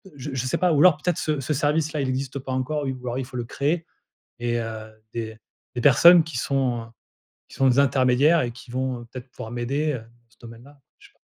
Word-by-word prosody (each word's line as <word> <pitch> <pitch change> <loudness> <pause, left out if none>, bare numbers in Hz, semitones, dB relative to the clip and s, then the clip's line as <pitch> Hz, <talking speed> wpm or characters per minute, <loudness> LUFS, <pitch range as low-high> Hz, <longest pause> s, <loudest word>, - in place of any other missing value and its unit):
je 140 +1 -7
je 130 -1 -2
sais - - 0
pas. 180 -1 +3
Ou 145 - +2
alors 180 -4 +6
peut-être 175 +2 -1
ce 155 -2 -1
ce 135 - -4
service-là 150 +1 0
il 135 - -1
existe 130 +1 -3
pas 130 0 -7
encore 135 +3 -2
ou 130 -2 -5
alors 120 +1 -2
il 130 - -3
faut 125 0 -8
le 120 - -3
créer 150 +7 -1 0.5
et 120 0 -1
heu, 110 -1 -6 0.2
des 110 -1 -5 0.4
des 120 - -2
personnes 165 +6 +7
qui 160 -6 -6
sont 130 -2 0
heu, - - -12 0.6
qui - - -13
sont 135 - +3
des 130 +1 +4
intermédiaires 140 +4 +4
et 120 - -2
qui 120 +2 -14
vont, 130 0 -2
heu, - - -11
peut-être 130 -1 -9
pouvoir 110 - -8
m'aider, 140 +6 -1
heu, - - -2
dans 115 +1 -21
ce 115 - -29
domaine-là. 120 +5 -14 0.2
Je - - -17
sais - - -30
pas. - - -39
130 Hz, 245 wpm, -24 LUFS, 120-145 Hz, 0.6 s, personnes